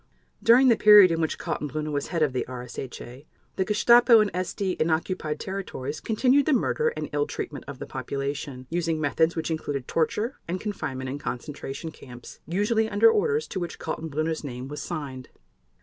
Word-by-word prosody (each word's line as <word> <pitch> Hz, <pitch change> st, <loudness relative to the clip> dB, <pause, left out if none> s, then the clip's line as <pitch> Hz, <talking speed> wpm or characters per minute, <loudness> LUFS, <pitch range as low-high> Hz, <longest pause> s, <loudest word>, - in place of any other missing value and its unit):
During 250 Hz, +3 st, +6 dB
the 235 Hz, -, +6 dB
period 210 Hz, -4 st, +8 dB
in 165 Hz, 0 st, 0 dB
which 160 Hz, -, -1 dB
Kaltenbrunner 150 Hz, +1 st, -3 dB
was 145 Hz, -1 st, -2 dB
head 165 Hz, -3 st, 0 dB
of 145 Hz, -4 st, +1 dB
the 125 Hz, -, 0 dB
RSHA, 125 Hz, +2 st, -8 dB, 0.3 s
the 190 Hz, -, +1 dB
Gestapo 230 Hz, +3 st, +6 dB
and 210 Hz, -3 st, +1 dB
SD 185 Hz, +1 st, -2 dB
in 160 Hz, -, +2 dB
occupied 160 Hz, -1 st, -1 dB
territories 170 Hz, -7 st, -5 dB
continued 255 Hz, +5 st, +2 dB
the 310 Hz, -, +4 dB
murder 465 Hz, -, +1 dB
and -, -, -3 dB
ill 440 Hz, -, +1 dB
treatment -, -, -6 dB
of -, -, -7 dB
the -, -, -6 dB
population, 140 Hz, -2 st, -5 dB
using 165 Hz, -2 st, 0 dB
methods 160 Hz, +2 st, +1 dB
which 160 Hz, 0 st, -2 dB
included 145 Hz, -4 st, -3 dB
torture 210 Hz, -, -1 dB
and 180 Hz, +2 st, -2 dB
confinement 130 Hz, -11 st, -4 dB
in 140 Hz, -, -5 dB
concentration 140 Hz, +4 st, -6 dB
camps, 125 Hz, -5 st, -12 dB
usually 215 Hz, +6 st, +1 dB
under 220 Hz, +2 st, +5 dB
orders 445 Hz, -, +1 dB
to 190 Hz, -, -3 dB
which 175 Hz, -2 st, -5 dB
Kaltenbrunner's 160 Hz, 0 st, -3 dB
name 125 Hz, -2 st, -6 dB
was 150 Hz, -, -6 dB
signed. 140 Hz, -7 st, -6 dB
160 Hz, 175 wpm, -26 LUFS, 140-210 Hz, 0.3 s, period